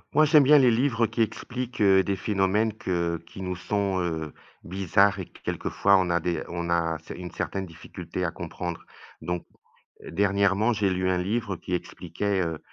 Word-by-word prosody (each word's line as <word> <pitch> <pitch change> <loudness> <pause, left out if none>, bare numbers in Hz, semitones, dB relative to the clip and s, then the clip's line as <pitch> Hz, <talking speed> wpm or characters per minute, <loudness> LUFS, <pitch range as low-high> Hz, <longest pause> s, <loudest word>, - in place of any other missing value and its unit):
Moi, 155 - +6
j'aime 150 0 +6
bien 145 +2 +7
les 125 -3 +6
livres, 120 -1 +1
heu, - - -1
qui 115 - -2
expliquent, 125 +1 -3
heu, 95 -1 +5
des 100 - -1
phénomènes 105 +2 +1
que 85 -5 -1
qui 95 - -10
nous 90 0 -3
sont, 100 +1 -1
heu, 80 -3 -3 0.3
bizarres 100 +2 +2
et 95 - -5
quelques - - -5
fois 100 0 +4
on 90 -2 +1
a 85 - +2
des 85 -1 -2
on 85 0 -4
a 85 -1 +1
ce - - -9
une 90 0 -7
certaine 95 -1 -3
difficulté 80 -1 -6
à - - -1
comprendre 85 -1 -6 0.4
donc 90 0 -3 0.6
dernièrement 100 +4 +2
j'ai 100 -2 +1
lu 95 0 0
un 95 - +2
livre 100 +2 -1
qui 90 - -8
expliquait, 95 +3 -2
heu 80 -2 -2
95 Hz, 190 wpm, -26 LUFS, 85-105 Hz, 0.6 s, bien